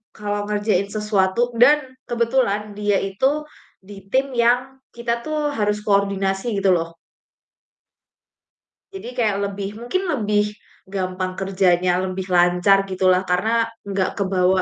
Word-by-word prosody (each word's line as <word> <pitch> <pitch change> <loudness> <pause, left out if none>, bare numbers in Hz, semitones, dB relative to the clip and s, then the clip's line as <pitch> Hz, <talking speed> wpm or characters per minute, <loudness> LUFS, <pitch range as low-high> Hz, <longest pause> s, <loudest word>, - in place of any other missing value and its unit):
kalau 205 -1 -3
ngerjain 205 -2 0
sesuatu 210 +2 0
dan 290 +5 +7 0.3
kebetulan 230 -3 0
dia 205 0 0
itu 265 +10 0 0.4
di 195 0 -12
tim 270 +1 +1
yang 250 +2 +1 0.2
kita 235 0 -2
tuh 305 -1 -1
harus 210 -4 -1
koordinasi, 200 +1 0
gitu 195 -1 +3
loh. 165 -2 0 2.0
Jadi 385 - -8
kayak 215 -5 +1
lebih, 200 0 -4
mungkin 245 +11 -2
lebih 210 -5 +1 0.5
gampang 185 -1 -2
kerjanya, 185 -2 +2 0.2
lebih 185 0 -4
lancar 180 +3 +4
gitu 185 0 -2
lah, 180 0 +3
karena 180 +5 +1 0.4
nggak 195 -1 0
kebawa, 185 -1 +2
205 Hz, 125 wpm, -21 LUFS, 190-235 Hz, 2.0 s, dan